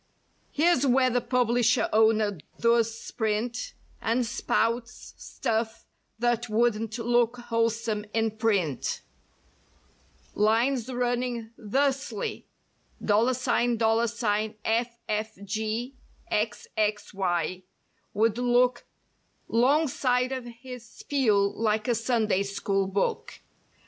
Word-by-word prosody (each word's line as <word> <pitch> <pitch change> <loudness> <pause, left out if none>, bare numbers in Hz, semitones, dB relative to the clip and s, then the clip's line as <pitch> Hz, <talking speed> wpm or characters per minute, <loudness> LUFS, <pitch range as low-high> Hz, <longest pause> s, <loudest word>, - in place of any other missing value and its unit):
Here's 315 -2 +3
where 255 -1 +3
the 245 +1 +1
publisher 245 -1 +2
owner 215 -3 +3 0.2
does 230 -1 +2
sprint 230 - -3 0.3
And 235 +2 +1
spouts 230 0 -1
stuff 225 0 -3 0.3
that 240 0 0
wouldn't 225 0 +1
look 240 0 +2
wholesome 230 -2 -1
in 225 0 +1
print. 200 - -1 1.3
Lines 235 +4 +2
running 245 -2 -1
thusly: 265 -1 -1 0.5
$$ffgxxy 225 -1 0 2.2
would 225 +1 +2
look 245 0 +2 0.6
'Long 280 +7 +3
side 250 -1 +1
of 260 -2 -4
his 245 +1 -9
spiel 225 -5 +1
like 220 0 0
a 245 - +3
Sunday 225 -3 +1
school 195 0 -1
book. 195 +1 -2
230 Hz, 80 wpm, -27 LUFS, 220-245 Hz, 2.2 s, Here's